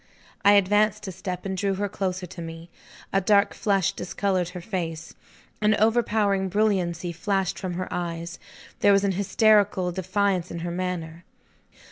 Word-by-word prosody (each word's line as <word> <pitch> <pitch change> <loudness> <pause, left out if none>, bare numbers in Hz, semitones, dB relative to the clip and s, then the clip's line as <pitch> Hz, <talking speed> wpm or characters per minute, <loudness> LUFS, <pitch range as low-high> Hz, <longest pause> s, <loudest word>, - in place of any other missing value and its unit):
I 200 0 +7
advanced 210 +1 +3
a - - -3
step, 180 0 -6
and 190 -1 -2
drew 195 +1 0
her 205 +2 -1
closer 190 -2 -3
to 170 - -9
me. 165 +1 -9 0.4
A 195 - +3
dark 200 +1 +3
flush 195 -4 +1
discolored 185 -2 -1
her 180 - -7
face. 170 -4 -5 0.5
An 210 0 +4
overpowering 210 -3 +2
brilliancy 185 -4 0
flashed 190 +2 -1
from 180 -2 -4
her 185 +1 -3
eyes; 170 -1 -4 0.4
there 205 - +5
was 195 0 +3
an 200 - +2
hysterical 200 -1 +3
defiance 185 0 0
in 170 - -6
her 175 +1 -3
manner. 175 -2 -4
190 Hz, 155 wpm, -25 LUFS, 175-200 Hz, 0.5 s, I